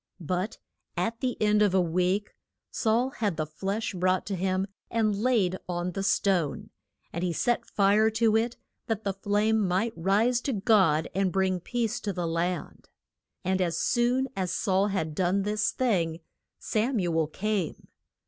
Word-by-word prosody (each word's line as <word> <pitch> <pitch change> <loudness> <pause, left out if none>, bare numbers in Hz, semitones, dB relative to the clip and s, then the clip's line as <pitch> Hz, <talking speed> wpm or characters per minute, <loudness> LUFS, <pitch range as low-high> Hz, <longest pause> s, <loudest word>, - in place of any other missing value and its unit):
But 180 +5 -2 0.4
at 230 0 -1
the 255 -1 -2
end 210 0 +3
of 200 -3 +3
a - - +5
week 180 +4 0 0.4
Saul 235 +3 +1
had 210 - -2
the 155 - -1
flesh 195 +8 -3
brought 185 0 +1
to 200 - -3
him 185 +1 0 0.2
and 220 -3 +1
laid 205 -5 +1
on 175 0 -2
the 195 - -4
stone, 185 -7 0 0.4
and 170 - -3
he 180 - +1
set 240 +8 0
fire 205 +2 +4
to 220 0 +2
it, 230 +2 0 0.3
that 220 -1 -2
the 195 - -1
flame 205 +3 +1
might 195 +4 0
rise 210 +8 +2
to 270 - -2
God 195 -8 +3
and 190 0 +1
bring 190 -1 +1
peace 235 +4 -2
to 205 - -3
the 175 -1 -2
land. 170 +2 -3 0.6
And 190 +1 +1
as 170 -2 0
soon 245 +5 +1
as 185 -2 -1
Saul 195 -1 +1
had 160 -6 -2
done 185 +4 +1
this 210 +1 0
thing, 175 -10 0 0.4
Sam 230 +4 0
u 175 -4 0
el 160 - +1
came. 200 +1 -3
195 Hz, 165 wpm, -27 LUFS, 180-220 Hz, 0.6 s, a